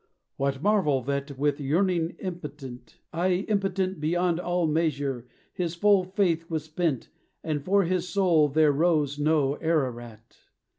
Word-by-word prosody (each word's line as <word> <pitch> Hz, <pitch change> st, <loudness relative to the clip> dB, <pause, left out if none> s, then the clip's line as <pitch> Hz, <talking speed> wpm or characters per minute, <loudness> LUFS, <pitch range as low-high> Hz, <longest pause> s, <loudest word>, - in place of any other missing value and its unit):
What 135 Hz, +1 st, -2 dB
marvel 180 Hz, -, +2 dB
that, 140 Hz, +1 st, -3 dB
With 145 Hz, +1 st, 0 dB
yearning 170 Hz, +3 st, 0 dB
impotent, 145 Hz, -, -8 dB, 0.2 s
ay, 180 Hz, +3 st, 0 dB
impotent 195 Hz, -3 st, -1 dB
Beyond 170 Hz, +2 st, 0 dB
all 175 Hz, -1 st, 0 dB
measure! 145 Hz, -6 st, -1 dB, 0.3 s
his 175 Hz, -2 st, -3 dB
full 200 Hz, +1 st, +3 dB
faith 180 Hz, -4 st, 0 dB
was 160 Hz, -3 st, -2 dB
spent, 155 Hz, -4 st, -2 dB, 0.3 s
And 150 Hz, -3 st, -2 dB
for 200 Hz, +4 st, +3 dB
his 180 Hz, 0 st, -1 dB
soul 175 Hz, -5 st, +3 dB
there 150 Hz, +1 st, +3 dB
rose 150 Hz, -2 st, +1 dB
no 145 Hz, -2 st, +2 dB
Ararat? 120 Hz, -8 st, -3 dB
160 Hz, 135 wpm, -26 LUFS, 140-180 Hz, 0.3 s, full